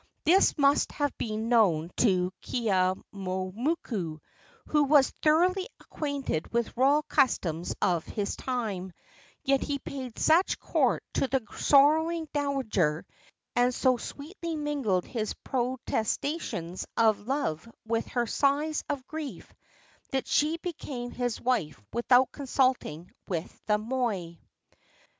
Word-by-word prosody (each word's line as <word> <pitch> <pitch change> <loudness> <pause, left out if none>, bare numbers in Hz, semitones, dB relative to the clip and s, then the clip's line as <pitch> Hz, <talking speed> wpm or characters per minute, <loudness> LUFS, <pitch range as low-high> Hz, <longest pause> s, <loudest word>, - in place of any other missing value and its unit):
This 360 +4 +4
must 280 0 +3
have 290 -1 -1
been 220 0 -2
known 180 -9 +3
to 185 -5 +2
Keeaumoku, 190 - -1 0.5
who 300 -1 +3
was 285 -1 +5
thoroughly 360 +5 +3
acquainted 285 - -3
with 235 -1 -1
royal 280 +5 +4
customs 175 - +1
of 170 -3 +1
his 205 -2 -2
time; 210 -8 -3 0.5
yet 275 0 +2
he 285 - -1
paid 260 -3 -7
such 335 +4 +3
court - - +1
to 275 - +1
the 260 -2 -1
sorrowing 315 +3 +4
dowager, 235 - 0 0.5
and 245 0 +3
so 255 -1 +3
sweetly 330 - -6
mingled 280 - 0
his 220 -4 -3
protestations 245 - -2
of 220 -2 +3
love 230 - -2 0.2
with 230 0 -1
her 240 -1 0
sighs 290 +5 +1
of 280 -3 -3
grief, 310 -2 -7 0.6
that 265 -1 -1
she 310 +3 +2
became 280 -8 -5
his 245 -3 -2
wife 205 - 0
without 245 +2 +4
consulting 255 - 0 0.2
with 170 -3 -4
the 210 -1 +3
moi. 215 -6 -2
250 Hz, 115 wpm, -28 LUFS, 200-285 Hz, 0.6 s, was